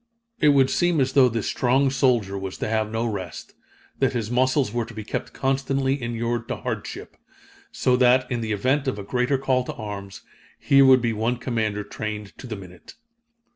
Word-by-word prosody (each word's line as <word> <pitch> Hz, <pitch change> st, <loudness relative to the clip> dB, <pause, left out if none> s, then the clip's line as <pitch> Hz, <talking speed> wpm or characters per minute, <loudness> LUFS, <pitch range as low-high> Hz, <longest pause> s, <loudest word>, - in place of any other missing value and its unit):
It 150 Hz, -, +5 dB
would 135 Hz, -2 st, +4 dB
seem 175 Hz, -3 st, +2 dB
as 135 Hz, 0 st, +1 dB
though 130 Hz, -3 st, +6 dB
this 115 Hz, -2 st, -3 dB
strong 135 Hz, +2 st, +2 dB
soldier 120 Hz, -7 st, +1 dB
was 95 Hz, -1 st, -5 dB
to -, -, -3 dB
have 110 Hz, -1 st, 0 dB
no 110 Hz, +1 st, -2 dB
rest 110 Hz, -3 st, -5 dB, 0.5 s
that -, -, +2 dB
his 115 Hz, -2 st, -3 dB
muscles 130 Hz, -1 st, +2 dB
were 120 Hz, -1 st, 0 dB
to 115 Hz, 0 st, -12 dB
be 110 Hz, -, -5 dB
kept -, -, -4 dB
constantly 135 Hz, 0 st, 0 dB
inured 120 Hz, 0 st, -2 dB
to -, -, -2 dB
hardship -, -, -6 dB, 0.6 s
so 125 Hz, -, +2 dB
that, 125 Hz, +1 st, +4 dB
in 120 Hz, -1 st, -1 dB
the 110 Hz, -1 st, -3 dB
event 130 Hz, +7 st, 0 dB
of 130 Hz, -, -1 dB
a 100 Hz, -, -6 dB
greater 125 Hz, +5 st, 0 dB
call 130 Hz, -1 st, +1 dB
to -, -, -5 dB
arms, 100 Hz, -3 st, -7 dB, 0.3 s
here 140 Hz, 0 st, +5 dB
would 130 Hz, -2 st, +6 dB
be 115 Hz, -1 st, +1 dB
one 115 Hz, +3 st, -1 dB
commander 110 Hz, -4 st, -2 dB
trained 105 Hz, -1 st, -6 dB
to 130 Hz, -, -8 dB
the 110 Hz, -, -4 dB
minute. 90 Hz, -3 st, -13 dB
120 Hz, 195 wpm, -24 LUFS, 110-130 Hz, 0.6 s, though